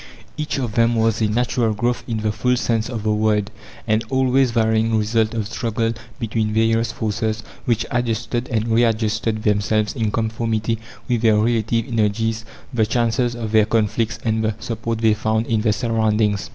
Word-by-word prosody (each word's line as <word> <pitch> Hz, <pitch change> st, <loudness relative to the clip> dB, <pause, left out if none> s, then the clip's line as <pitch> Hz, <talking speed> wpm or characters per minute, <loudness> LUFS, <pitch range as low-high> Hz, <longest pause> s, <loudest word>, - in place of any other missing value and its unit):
Each 150 Hz, -1 st, -3 dB
of 120 Hz, -5 st, -2 dB
them 115 Hz, 0 st, +3 dB
was 115 Hz, 0 st, +1 dB
a 110 Hz, -, +3 dB
natural 115 Hz, 0 st, 0 dB
growth 120 Hz, +3 st, -1 dB
in 110 Hz, -3 st, -2 dB
the 110 Hz, 0 st, 0 dB
full 125 Hz, +3 st, +1 dB
sense 115 Hz, -1 st, 0 dB
of 115 Hz, -4 st, -4 dB
the 110 Hz, 0 st, +1 dB
word 105 Hz, -1 st, +1 dB, 0.3 s
an 110 Hz, +1 st, +2 dB
always 130 Hz, 0 st, +3 dB
varying 110 Hz, -1 st, +2 dB
result 110 Hz, +1 st, +1 dB
of 110 Hz, -3 st, -2 dB
struggle 115 Hz, 0 st, -1 dB, 0.3 s
between 110 Hz, -1 st, -1 dB
various 115 Hz, +1 st, +2 dB
forces 110 Hz, 0 st, -2 dB, 0.2 s
which 115 Hz, -1 st, +1 dB
adjusted 120 Hz, 0 st, -1 dB
and 115 Hz, -2 st, 0 dB
re 115 Hz, +1 st, +4 dB
adjusted 110 Hz, -1 st, 0 dB
themselves 105 Hz, +1 st, +1 dB
in 110 Hz, -4 st, 0 dB
conformity 110 Hz, 0 st, -1 dB, 0.3 s
with 120 Hz, -3 st, 0 dB
their 110 Hz, -2 st, +4 dB
relative 115 Hz, 0 st, +1 dB
energies, 110 Hz, -1 st, 0 dB, 0.3 s
the 110 Hz, -3 st, +2 dB
chances 120 Hz, +1 st, +1 dB
of 115 Hz, -3 st, -4 dB
their 110 Hz, -1 st, +5 dB
conflicts, 110 Hz, 0 st, 0 dB
and 110 Hz, 0 st, +1 dB
the 110 Hz, -1 st, 0 dB
support 115 Hz, 0 st, -3 dB
they 110 Hz, -1 st, +4 dB
found 110 Hz, +1 st, 0 dB
in 110 Hz, -2 st, 0 dB
their 110 Hz, -1 st, +2 dB
surroundings. 110 Hz, -2 st, 0 dB
110 Hz, 175 wpm, -21 LUFS, 110-115 Hz, 0.3 s, their